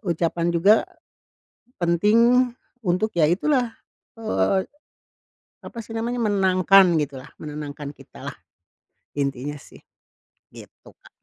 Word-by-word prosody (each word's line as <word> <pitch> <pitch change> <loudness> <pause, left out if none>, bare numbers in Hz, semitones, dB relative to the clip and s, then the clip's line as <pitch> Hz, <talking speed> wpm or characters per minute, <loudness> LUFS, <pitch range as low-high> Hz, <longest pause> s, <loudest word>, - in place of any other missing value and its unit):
ucapan 170 0 0
juga 195 +6 +6 1.1
penting 230 +9 +4 0.3
untuk 185 +5 +1
ya 160 - +5
itulah, 235 - +1 0.5
eee, 190 - +1 1.1
apa - - -12
sih 220 - -14
namanya, 235 +2 -2
menangkan 190 -2 +4
gitu 140 -2 -4
lah, 130 - -12
menenangkan 150 -1 -6
kita - - -15
lah. - - -6 0.8
Intinya 140 +1 -2
sih, 140 - -16 0.7
gitu, - - -15
Kak. - - -17
180 Hz, 105 wpm, -23 LUFS, 150-220 Hz, 1.1 s, juga